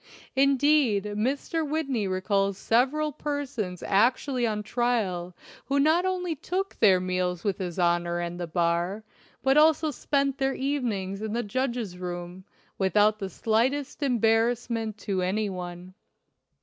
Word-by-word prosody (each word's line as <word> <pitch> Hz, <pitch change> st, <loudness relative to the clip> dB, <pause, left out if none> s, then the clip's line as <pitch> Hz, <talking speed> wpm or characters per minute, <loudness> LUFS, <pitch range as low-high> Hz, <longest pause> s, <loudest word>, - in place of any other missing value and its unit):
Indeed, 275 Hz, -5 st, +3 dB
Mr. 255 Hz, +10 st, -1 dB
Whitney 280 Hz, -8 st, -1 dB
recalls 195 Hz, +1 st, 0 dB
several 270 Hz, +9 st, +1 dB
persons 275 Hz, -, -4 dB
actually 245 Hz, +4 st, +2 dB
on 210 Hz, -1 st, -2 dB
trial 205 Hz, -7 st, -1 dB, 0.3 s
who 280 Hz, +1 st, +1 dB
not 320 Hz, +5 st, +3 dB
only 360 Hz, -2 st, -1 dB
took 380 Hz, +7 st, -3 dB
their 190 Hz, -4 st, +6 dB
meals 180 Hz, -1 st, -2 dB
with 200 Hz, -3 st, -1 dB
his 180 Hz, -3 st, -4 dB
Honor 175 Hz, -1 st, +1 dB
and 175 Hz, 0 st, -4 dB
the 175 Hz, -, -3 dB
bar, 170 Hz, +4 st, 0 dB, 0.4 s
but 270 Hz, +2 st, +4 dB
also 310 Hz, 0 st, +4 dB
spent 275 Hz, 0 st, -1 dB
their 270 Hz, 0 st, +1 dB
evenings 225 Hz, -9 st, -2 dB
in 215 Hz, -1 st, -3 dB
the 240 Hz, +1 st, -1 dB
judge's 235 Hz, -4 st, -3 dB
room, 175 Hz, +1 st, -6 dB, 0.3 s
without 210 Hz, +2 st, +3 dB
the 195 Hz, -2 st, -4 dB
slightest 250 Hz, -, 0 dB
embar 230 Hz, -4 st, +3 dB
rassment 230 Hz, -3 st, -3 dB
to 195 Hz, -3 st, -2 dB
any 200 Hz, +3 st, 0 dB
one. 180 Hz, 0 st, -7 dB
220 Hz, 135 wpm, -27 LUFS, 185-275 Hz, 0.4 s, their